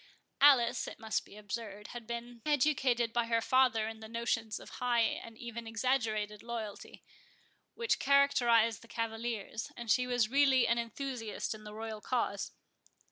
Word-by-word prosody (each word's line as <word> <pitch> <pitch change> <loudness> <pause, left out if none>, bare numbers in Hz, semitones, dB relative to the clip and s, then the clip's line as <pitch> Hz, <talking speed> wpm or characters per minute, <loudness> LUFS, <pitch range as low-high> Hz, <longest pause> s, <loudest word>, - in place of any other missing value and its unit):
Alice, 250 -4 +5
it - - -7
must 220 -1 -2
be 205 - -14
observed, 210 0 -6
had 240 -2 -8
been 235 0 -6
educated 260 -5 +2
by 235 -1 +2
her 230 0 +2
father 250 -2 +3
in 220 0 -7
the 220 - -9
notions 230 -1 -1
of - - -12
high 240 -1 +3
and 225 0 -2
even 235 -1 -7
exaggerated 225 -3 0
loyalty, 225 -3 -7 0.7
which 465 -1 0
characterized 240 -5 +4
the 230 - -15
cavaliers, 225 -1 -4
and 235 -2 -2
she 250 +3 +3
was 245 -3 +2
really 270 0 +4
an 235 0 +2
enthusiast 235 -1 -4
in 215 0 -11
the 210 - -8
royal 220 -1 -5
cause. 205 -5 -1
235 Hz, 155 wpm, -32 LUFS, 220-250 Hz, 0.7 s, Alice